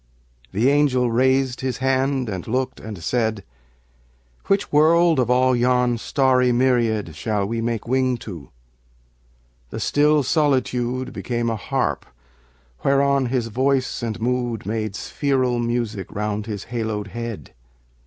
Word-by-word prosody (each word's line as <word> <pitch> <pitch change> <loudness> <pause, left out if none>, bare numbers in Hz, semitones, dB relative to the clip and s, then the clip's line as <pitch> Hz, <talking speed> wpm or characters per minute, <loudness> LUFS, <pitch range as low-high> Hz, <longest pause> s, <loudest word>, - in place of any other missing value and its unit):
The 110 +6 +1
angel 135 -4 +3
raised 130 +1 +2
his 130 -1 -2
hand 135 0 0
and 95 -4 -5
looked 130 +3 -2
and 105 -6 -8
said, 110 0 -1 1.0
"Which 195 0 +1
world, 165 +1 +4
of 125 -2 +1
all 130 +1 +3
yon 125 -1 +2
starry 130 -1 +2
myriad 120 - +1
Shall 105 +2 -1
we 115 +3 -2
make 115 -1 -2
wing 130 0 +1
to?" 85 -9 -8 1.2
The - - -6
still 150 0 +3
solitude 130 -3 0
Became 120 -1 -2
a - - -1
harp 105 - -2 0.8
whereon 140 -1 +2
his 120 -2 -1
voice 130 +3 0
and 115 -2 -3
mood 120 -2 -1
Made 110 -1 -3
spheral 130 -2 0
music 115 -4 -2
round 105 +1 -3
his 105 -3 -5
haloed 110 -3 -3
head. 115 - -6
125 Hz, 130 wpm, -22 LUFS, 110-130 Hz, 1.2 s, world